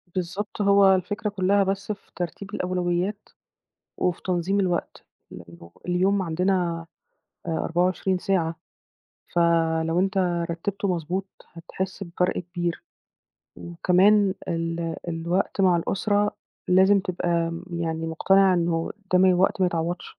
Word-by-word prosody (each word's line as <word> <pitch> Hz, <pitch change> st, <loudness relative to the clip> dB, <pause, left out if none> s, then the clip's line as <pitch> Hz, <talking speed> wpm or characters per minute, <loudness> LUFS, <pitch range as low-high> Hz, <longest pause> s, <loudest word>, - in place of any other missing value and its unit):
بالضبط، 190 Hz, +4 st, -3 dB
هو 200 Hz, -1 st, +6 dB
الفكرة 205 Hz, +3 st, -2 dB
كُلّها 200 Hz, 0 st, +2 dB
بس 195 Hz, +2 st, -2 dB
في 200 Hz, -, -9 dB
ترتيب 190 Hz, +4 st, -5 dB
الأولويات 180 Hz, +3 st, -2 dB, 0.7 s
وفي 180 Hz, -2 st, -1 dB
تنظيم 185 Hz, +2 st, 0 dB
الوقت، 180 Hz, -2 st, -2 dB, 0.3 s
لإنّه 85 Hz, 0 st, -12 dB, 0.2 s
اليوم 190 Hz, +2 st, +2 dB
عندنا 175 Hz, -1 st, 0 dB, 0.6 s
آآ -, -, -1 dB
24 180 Hz, +3 st, 0 dB
ساعة، 170 Hz, -4 st, 0 dB, 0.8 s
فلو 165 Hz, 0 st, +2 dB
أنت 195 Hz, +1 st, 0 dB, 0.3 s
رتّبته 195 Hz, +4 st, -3 dB
مضبوط 180 Hz, +2 st, -2 dB, 0.3 s
هتحِس 190 Hz, +3 st, -5 dB
بفرق 180 Hz, 0 st, -1 dB
كبير. 175 Hz, -1 st, -4 dB, 0.7 s
وكمان 190 Hz, +4 st, +3 dB
ال 165 Hz, 0 st, -2 dB
الوقت 170 Hz, +4 st, -1 dB
مع 185 Hz, -2 st, +4 dB
الأسرة 205 Hz, +4 st, 0 dB, 0.4 s
لازم 190 Hz, +2 st, +5 dB
تبقى 170 Hz, -2 st, -1 dB
يعني 165 Hz, -1 st, -3 dB
مقتنع 190 Hz, +3 st, +3 dB
إنه 170 Hz, -1 st, 0 dB, 0.2 s
ده 180 Hz, -, +5 dB
م 185 Hz, 0 st, +5 dB
وقت 190 Hz, +1 st, +2 dB
ما 185 Hz, -, +4 dB
يتعوّضش. 170 Hz, +1 st, -3 dB
180 Hz, 115 wpm, -25 LUFS, 170-195 Hz, 0.8 s, هو